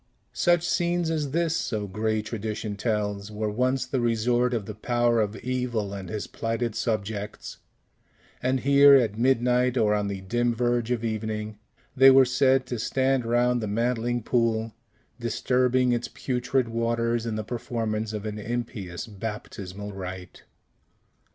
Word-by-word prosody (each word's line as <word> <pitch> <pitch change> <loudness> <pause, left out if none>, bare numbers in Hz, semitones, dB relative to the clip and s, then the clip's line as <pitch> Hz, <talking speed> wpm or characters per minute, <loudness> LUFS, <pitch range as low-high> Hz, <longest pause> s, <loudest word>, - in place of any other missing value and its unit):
Such 175 -1 +2
scenes 175 -1 +1
as 150 -3 -1
this 165 +2 0
(so 105 -8 -2
gray 110 +2 -1
tradition 110 -1 -4
tells) 105 -1 -2
were 105 0 -2
once 125 +3 0
the 130 +1 -2
resort 120 +1 +1
of 115 -5 -2
the 105 - -6
Power 120 +1 +1
of 105 0 -2
Evil 120 -3 -2
and 95 -2 -6
his 110 -1 -4
plighted 115 0 -2
subjects; 105 -1 -3 0.8
and 130 0 0
here, 140 +1 +7
at 115 -5 +2
midnight 125 0 +2
or 105 -3 +3
on 105 -1 0
the 100 -1 -4
dim 120 +4 0
verge 120 -1 0
of 120 -2 -1
evening, 110 -1 -3 0.4
they 135 +1 +8
were 135 0 +7
said 130 +1 +3
to 125 -2 -4
stand 130 +1 +1
round 120 +1 +2
the 110 - -2
mantling 120 +2 0
pool, 115 -2 0 0.5
disturbing 125 +2 +1
its 120 0 0
putrid 125 0 -1
waters 115 0 0
in 110 - -2
the 110 - -3
performance 110 -2 -3
of 105 -1 -5
an 105 0 -4
impious 105 -5 -4
baptismal 105 -2 -7
rite. 95 -1 -8
115 Hz, 150 wpm, -26 LUFS, 105-125 Hz, 0.8 s, they